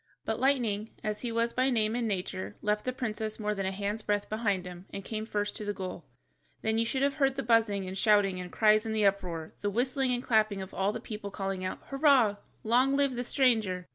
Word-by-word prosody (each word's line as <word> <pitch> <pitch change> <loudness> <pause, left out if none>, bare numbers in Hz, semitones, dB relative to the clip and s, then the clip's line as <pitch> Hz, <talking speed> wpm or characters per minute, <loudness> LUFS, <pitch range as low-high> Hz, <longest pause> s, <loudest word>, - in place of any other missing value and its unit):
But 220 0 -1
Lightning 235 -6 +1
(as 210 -1 -2
he 240 - -3
was 230 +1 0
by 255 +1 +2
name 220 -3 +1
and 240 -1 0
nature) 190 0 -3
left 210 0 0
the 255 - 0
princess 220 -3 -3
more 210 -1 0
than 195 -2 -2
a - - -1
hand's 205 +3 -3
breadth 205 -1 -1
behind 205 -4 0
him, 180 +1 -9
and 195 - -6
came 220 -1 -4
first 205 -2 -2
to 215 - -6
the 205 0 -3
goal. 185 -4 -6 0.6
Then 220 0 +1
you 230 - +2
should 265 +3 -1
have 280 +1 +1
heard 270 -2 +2
the 270 - -2
buzzing 225 -4 +2
and 185 - -5
shouting 200 -2 +3
and 180 -1 -8
cries 215 -1 +4
and 220 -1 -3
the 215 -1 +2
uproar, 180 -5 -1
the 205 - 0
whistling 255 +4 +1
and 245 0 -1
clapping 215 -4 +2
of 190 0 -7
all 195 +1 +1
the 230 - -5
people 210 -3 -6
calling 195 -2 -3
out, 185 - -4
"Hurrah, 275 -7 +3 0.3
long 255 +5 +3
live 280 -2 +3
the 245 - -2
stranger!" 220 - +1
215 Hz, 230 wpm, -30 LUFS, 200-240 Hz, 0.6 s, cries